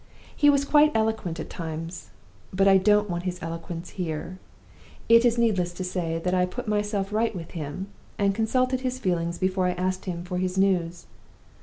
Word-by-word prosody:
He 290 - +5
was 280 -1 +3
quite 300 +1 +5
eloquent 220 -6 0
at - - -6
times; 165 +1 -6 0.4
but 195 +1 +2
I 195 -1 +7
don't 210 +2 +3
want 175 -2 -3
his 180 -1 -2
eloquence 165 0 -6
here. 170 +2 -4 0.7
It 230 0 +7
is 240 0 +3
needless 190 -7 +1
to 185 - -5
say 175 -3 -2
that 180 +2 -2
I 180 0 +2
put 240 +6 -6
myself 210 -1 -1
right 225 0 +1
with 170 -2 -7
him, 160 +3 -5 0.3
and 200 -1 +2
consulted 255 +4 +1
his 255 -1 -2
feelings 175 -7 -1
before 185 0 +1
I 180 - +1
asked 185 +1 -2
him 175 -2 -4
for 180 0 -3
his 185 0 -2
news. 175 -3 +1
185 Hz, 185 wpm, -26 LUFS, 175-215 Hz, 0.7 s, I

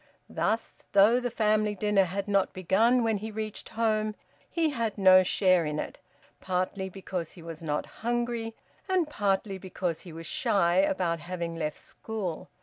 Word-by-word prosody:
Thus, 225 +1 -1
though 205 +5 +6
the 245 -1 -2
family 215 -2 +1
dinner 205 -1 +3
had 195 +3 -3
not 200 -2 +2
begun 220 +7 +3
when 225 -2 +1
he 215 +2 -5
reached 215 0 -5
home, 215 -1 0 0.3
he 325 -3 +1
had 230 -6 -2
no 185 -1 +7
share 185 -1 +3
in 150 -1 -2
it, - - -5 0.4
partly 185 +1 -2
because 185 -3 -5
he 170 - -13
was 165 -1 -8
not 150 -2 -2 0.2
hungry, 235 -1 -1 0.3
and 365 -4 +2
partly 200 -6 -1
because 180 -3 -3
he 175 - -10
was 165 +1 -8
shy 175 +2 +2
about 185 -3 +2
having 170 -1 -4
left 155 -2 -3
school. 205 -7 -6
195 Hz, 160 wpm, -28 LUFS, 180-220 Hz, 0.4 s, no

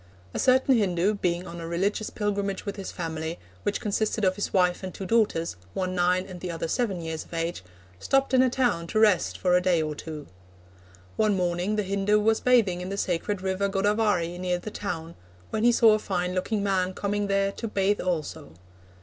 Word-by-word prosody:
A - - -3
certain 260 +1 +4
Hindu, 195 -2 +2
being 180 -3 -1
on 170 -1 -8
a 165 - -5
religious 195 +5 -1
pilgrimage 200 -2 -2
with 200 - -4
his 195 -2 -6
family, 160 -1 -4 0.2
which 205 - -1
consisted 215 0 0
of 185 0 +2
his 205 - -3
wife 180 -2 +2
and 190 -1 -5
two 195 - -7
daughters, 185 - +1 0.2
one 185 -1 -1
nine 180 +1 +2
and 185 -2 -9
the 180 - -5
other 165 -1 -3
seven 195 -2 -1
years 160 -1 -4
of - - -10
age, 165 - -2 0.4
stopped 270 - +1
in 255 - +6
a 260 - +4
town 240 -10 0
to 215 - 0
rest 210 -5 +3
for 180 -1 +2
a 180 - +4
day 180 -2 +2
or 155 -1 -1
two. 150 -1 -7 0.9
One 215 -2 +2
morning 180 +3 0
the 210 - 0
Hindu 200 +2 +2
was 220 +1 +2
bathing 220 -8 +3
in 180 - -5
the 200 - -4
sacred 185 +2 -1
river 190 +1 0
Godavari, 195 -3 +1
near 180 -1 0
the 210 +4 -7
town, 165 -6 -5 0.4
when 215 - -1
he 240 - +6
saw 230 -2 +6
a 215 - +2
fine 180 -3 -2
looking 200 +3 -1
man 190 -2 0
coming 205 0 -1
there 195 0 +1
to 230 - -5
bathe 200 -1 +1
also. 160 - -3
190 Hz, 205 wpm, -26 LUFS, 175-210 Hz, 0.9 s, in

